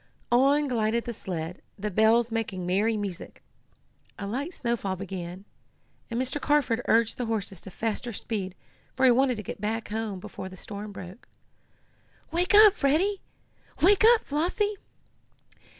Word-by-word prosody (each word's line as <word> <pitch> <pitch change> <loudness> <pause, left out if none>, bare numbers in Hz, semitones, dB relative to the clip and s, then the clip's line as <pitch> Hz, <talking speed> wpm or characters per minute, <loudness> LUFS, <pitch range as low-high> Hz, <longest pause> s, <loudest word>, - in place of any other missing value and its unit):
On 280 +4 +4
glided 230 -2 0
the 235 - -4
sled, 175 -4 -5 0.2
the 210 +1 -3
bells 225 +4 +4
making 215 -5 -2
merry 205 +5 +1
music. 200 -3 -6 0.7
A 200 - -5
light 270 - -3
snowfall 235 - -2
began, 185 0 -7 0.6
and 235 0 -2
Mr. 260 +3 -1
Carford 275 -6 +2
urged 225 +1 +3
the 245 - -1
horses 200 -5 -3
to - - -9
faster 225 +4 -3
speed, 195 -3 -4 0.4
for 260 - +3
he 255 - +7
wanted 255 +1 +3
to 215 - -5
get 195 - -7
back 220 +2 -2
home 215 -3 -3
before 190 - -8
the 185 - -12
storm 205 +2 -7
broke. 190 +2 -10 1.0
"Wake 355 +5 +2
up, 425 -1 +9
Freddie!" 370 +5 +1 0.6
"Wake 400 +4 +6
up, 450 - -3
Flossie!" 355 +8 0
225 Hz, 150 wpm, -27 LUFS, 195-265 Hz, 1.0 s, up